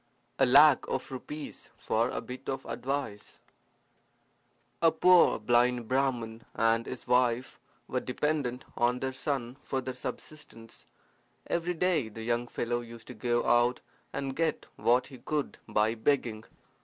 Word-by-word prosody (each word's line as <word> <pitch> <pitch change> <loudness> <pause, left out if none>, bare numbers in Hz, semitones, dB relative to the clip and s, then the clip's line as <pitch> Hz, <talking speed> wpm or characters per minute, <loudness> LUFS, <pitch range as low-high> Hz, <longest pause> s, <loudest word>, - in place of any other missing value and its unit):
A 135 - +5
Lac 140 +2 +7
of 130 - -3
Rupees 150 +3 -7
for 115 +3 0
a - - -3
Bit 130 +1 -8
of 135 - -3
Advice 135 -6 -4 1.4
A 165 - +6
poor 180 +2 +5
blind 120 +1 +2
Brahman 120 -4 -1
and 115 +1 +2
his 130 - -7
wife 125 0 +1 0.3
were 130 - -1
dependent 130 -1 -2
on 120 +1 +2
their 130 0 -2
son 130 -2 -3
for 135 - -2
their 130 0 -4
subsistence. 125 -3 -8 0.6
Every 175 +1 -1
day 165 -8 +1
the 110 +1 -8
young 120 +1 0
fellow 120 0 -2
used 115 -1 -11
to - - -6
go 120 -1 0
out 120 +1 +3 0.3
and 135 -1 -4
get 165 0 0
what 125 +2 +3
he 130 -3 -12
could 150 -2 -3
by 105 +1 +2
begging. 115 -2 0
125 Hz, 145 wpm, -30 LUFS, 120-140 Hz, 1.4 s, Lac